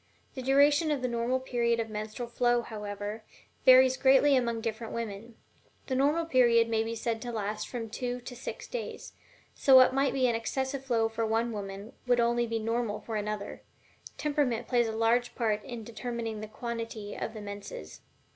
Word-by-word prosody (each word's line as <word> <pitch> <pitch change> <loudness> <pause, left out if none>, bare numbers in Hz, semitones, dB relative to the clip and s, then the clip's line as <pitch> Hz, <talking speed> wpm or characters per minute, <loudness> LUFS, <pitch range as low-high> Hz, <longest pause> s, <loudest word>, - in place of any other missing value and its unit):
The 260 - -6
duration 285 +4 +4
of 285 -4 -1
the - - +2
normal 240 +2 0
period 235 -2 0
of 225 - -1
menstrual 215 +2 -5
flow, 240 0 +1
however, 210 0 -6 0.4
varies 260 0 +7
greatly 270 +1 +5
among 235 -3 0
different 225 0 -4
women; 230 0 -5 0.5
the 265 - -3
normal 290 +5 +2
period 240 -6 +4
may 225 -1 +1
be 225 +1 -4
said 225 0 -2
to 240 - -4
last 215 -1 -3
from 235 -3 -5
two 245 +2 -4
to 245 +1 -8
six 250 - -7
days, - - -6 0.4
so 270 - +5
what 255 0 +8
might 275 +1 +2
be 265 -2 +2
an 240 - +2
excessive 265 +4 -2
flow 235 -4 +1
for 225 0 -3
one 225 +2 0
woman 200 0 -6
would 245 - +5
be - - +3
only 235 0 +1
normal 225 -1 -1
for 225 - -6
another 210 -1 -4 0.6
temperament 280 -6 0
plays 240 -2 +2
a - - -2
large 230 +2 +1
part 215 -3 0
in 240 -3 -7
determining 230 -1 -5
the 215 - -6
quantity 230 -2 -5
of 225 - -5
the 215 - -6
menses. 200 - -8
235 Hz, 185 wpm, -29 LUFS, 220-255 Hz, 0.6 s, what